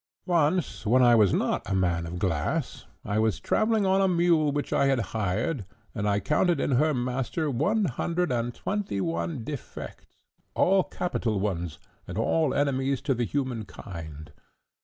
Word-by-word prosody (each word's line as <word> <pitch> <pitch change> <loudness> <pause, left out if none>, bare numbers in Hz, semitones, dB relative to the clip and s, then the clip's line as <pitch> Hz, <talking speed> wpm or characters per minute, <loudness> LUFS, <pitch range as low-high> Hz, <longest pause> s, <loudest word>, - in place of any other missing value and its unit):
"Once, 175 0 +1
when 125 +4 +4
I 120 -1 +6
was 105 -5 +5
not - - 0
a 95 - 0
man 85 -3 0
of 85 +2 -5
glass, 85 -5 -2 0.2
I 105 0 0
was 110 -3 +1
travelling 220 -1 +1
on 190 +1 +3
a 195 - +4
mule 170 -4 +3
which 145 0 -2
I 140 - +3
had 135 -1 +3 0.2
hired, 110 - -1 0.3
and 105 -1 -1
I 100 0 +2
counted 165 - +1
in - - 0
her 150 +5 +3
master 130 +4 -1
one 200 - +1
hundred 170 +3 -1
and 120 0 0
twenty 195 - -3
one 85 +3 -2
defects, 140 +1 -8 0.4
all 190 0 +4
capital 120 - -2
ones, 90 -5 -2 0.3
and 90 - -6
all 150 +6 +2
enemies 135 -1 +1
to 140 0 +1
the 120 -1 -1
human 130 -4 -2
kind. 80 -6 -9
125 Hz, 165 wpm, -27 LUFS, 100-160 Hz, 0.4 s, I